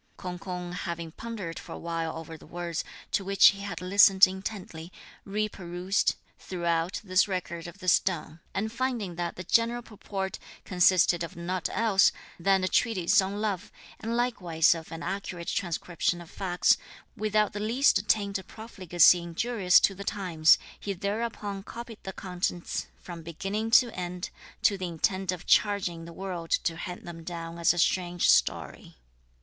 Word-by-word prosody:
K'ung 180 -1 -6
K'ung 180 -1 -5
having 170 -2 -4
pondered 200 -4 -6
for - - -9
a - - -7
while 165 -1 -3
over 165 0 -8
the 155 - -15
words, 170 -1 -4 0.3
to 195 - +1
which 195 0 +7
he 195 - -4
had 200 -2 -5
listened 195 +1 +7
intently, 185 -3 -6 0.3
re 210 +2 -1
perused, 180 0 -1 0.2
throughout, 170 -1 -1
this 185 -1 +3
record 175 -3 -4
of 170 - -10
the 185 -2 -9
stone; 170 -3 +1 0.2
and 220 +3 -1
finding 235 -6 -2
that 170 0 -3
the 185 - -6
general 230 +5 +2
purport 195 -3 -5 0.3
consisted 180 -1 +4
of 170 - -7
nought 175 +1 -3
else 210 -4 +4 0.3
than 190 +2 +3
a - - +2
treatise 205 -2 +3
on 195 +2 -3
love, 205 -3 -2 0.3
and 230 +1 -2
likewise 180 -11 +2
of 165 -1 -9
an 165 +1 -6
accurate 185 -3 -4
transcription 175 -1 -1
of 170 -1 -12
facts, 180 -2 +2 0.4
without 215 0 +1
the 205 - -4
least 220 0 +2
taint 200 -2 +1
of 190 - -13
profligacy 180 -6 +3
injurious 180 +2 +3
to 195 - +2
the 200 +1 -8
times, 175 -7 +3 0.2
he 200 - -3
thereupon 205 0 -3
copied 230 +1 -9
the 190 - -6
contents, 180 -2 -3
from 170 -2 -9
beginning 195 +7 -3
to 235 0 +5
end, 180 0 -5 0.3
to 200 -2 +3
the 185 - -2
intent 185 +3 0
of 180 -1 -7
charging 185 -5 +2
the 170 - -9
world 175 -2 -6
to 165 - +1
hand 175 +2 -7
them 165 -1 -8
down 170 0 -6
as 170 - +5
a 175 - -3
strange 175 0 +1
story. - - +1
185 Hz, 165 wpm, -28 LUFS, 170-200 Hz, 0.4 s, which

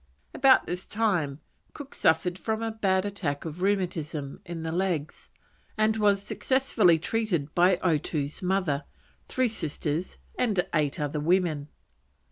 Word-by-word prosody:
About 270 -1 +5
this 180 +1 -4
time 175 -10 0 0.3
Cook 285 -2 -9
suffered 175 +3 +2
from 220 +2 -2
a 225 - -1
bad 195 -3 +1
attack 170 -9 -3
of 165 +2 -6
rheumatism 170 -7 -1
in 165 -1 -5
the 160 - -3
legs, 170 -4 -2 0.5
and 215 0 +3
was 205 -2 +3
successfully 215 -5 +2
treated 170 -5 -1
by 180 +1 +5
Otoo's 150 -3 -1
mother, 180 -7 0 0.4
three 255 -1 +1
sisters, 160 -4 -3 0.2
and 210 -7 +1
eight 150 -3 +1
other 150 0 -2
women. 160 -2 +1
180 Hz, 130 wpm, -27 LUFS, 155-205 Hz, 0.5 s, About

